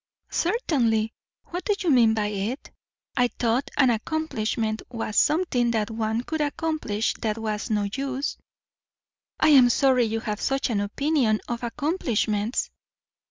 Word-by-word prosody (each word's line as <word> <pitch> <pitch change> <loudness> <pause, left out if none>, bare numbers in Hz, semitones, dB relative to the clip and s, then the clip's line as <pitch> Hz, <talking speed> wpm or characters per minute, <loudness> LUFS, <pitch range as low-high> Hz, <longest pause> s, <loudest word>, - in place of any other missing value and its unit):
"Certainly. 245 - +1 0.4
What 355 +1 -4
do 415 - +2
you 350 -5 +1
mean 230 -4 +5
by 210 -1 0
it?" 210 +6 -4 0.4
"I 245 -2 +3
thought 240 +2 -1
an 265 -4 +5
accomplishment 225 -4 -2
was 225 -3 -4
something 295 - +2
that 225 -1 0
one 220 0 -1
could 315 +4 -3
accomplish 295 -8 -1
that 220 -1 -1
was 215 0 -3
no 210 -2 +1
use." 275 +1 -2 1.0
"I 310 - +4
am 260 -5 +7
sorry 255 -1 +3
you 225 0 -2
have 210 -1 -4
such 270 -2 0
an 210 - +1
opinion 230 +1 +1
of 235 -1 -3
accomplishments." 240 - -1
240 Hz, 140 wpm, -25 LUFS, 220-285 Hz, 1.0 s, am